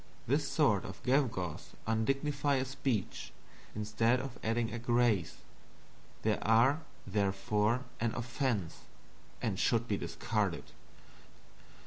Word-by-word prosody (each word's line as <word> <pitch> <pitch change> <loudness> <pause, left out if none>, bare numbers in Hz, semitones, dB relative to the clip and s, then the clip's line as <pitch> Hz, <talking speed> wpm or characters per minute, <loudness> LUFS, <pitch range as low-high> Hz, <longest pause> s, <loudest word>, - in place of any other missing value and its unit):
This 140 +3 +1
sort 135 - +3
of 95 - -9
gewgaws 125 - 0
undignify 135 +6 +1
a 130 - 0
speech, 130 -6 -2 0.4
instead 110 +3 +2
of 130 -1 -6
adding 115 0 0
a 120 - -3
grace. 120 -6 +2 0.9
They - - +2
are, 120 +7 +4 0.2
therefore, 105 +4 +1 0.2
an 115 -1 0
offense, 120 - -1 0.6
and - - -1
should - - +2
be - - 0
discarded. - - -2
120 Hz, 105 wpm, -33 LUFS, 105-135 Hz, 0.9 s, are